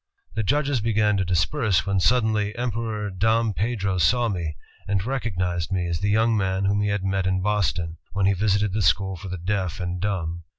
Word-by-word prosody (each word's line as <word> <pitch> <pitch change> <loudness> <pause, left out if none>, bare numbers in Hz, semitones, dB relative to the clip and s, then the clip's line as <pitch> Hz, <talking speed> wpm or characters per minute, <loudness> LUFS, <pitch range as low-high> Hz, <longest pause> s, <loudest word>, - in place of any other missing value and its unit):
The 110 - -1
judges 140 +2 +1
began 105 -1 +2
to 95 - +1
disperse, 95 - +1
when 100 -1 +1
suddenly 110 -1 +2
Emperor 110 -3 -2
Dom 110 +3 +1
Pedro 100 -3 -1
saw 120 +7 +3
me, 85 -6 -3 0.3
and 100 -1 0
recognized 90 -9 -2
me 90 -2 0
as 85 -1 -2
the 100 - 0
young 110 +2 +3
man 95 -1 0
whom 100 +1 +2
he 105 - +1
had 100 -1 -1
met 95 -1 0
m 95 0 +1
Boston, 90 -4 -1 0.2
when 100 -1 +1
he 100 - +4
visited 100 0 +1
the 110 - 0
school 95 +1 +2
for 95 +3 -9
the 90 - -4
deaf 95 0 -2
and 90 0 -3
dumb. 85 -4 -2
100 Hz, 200 wpm, -24 LUFS, 90-110 Hz, 0.3 s, he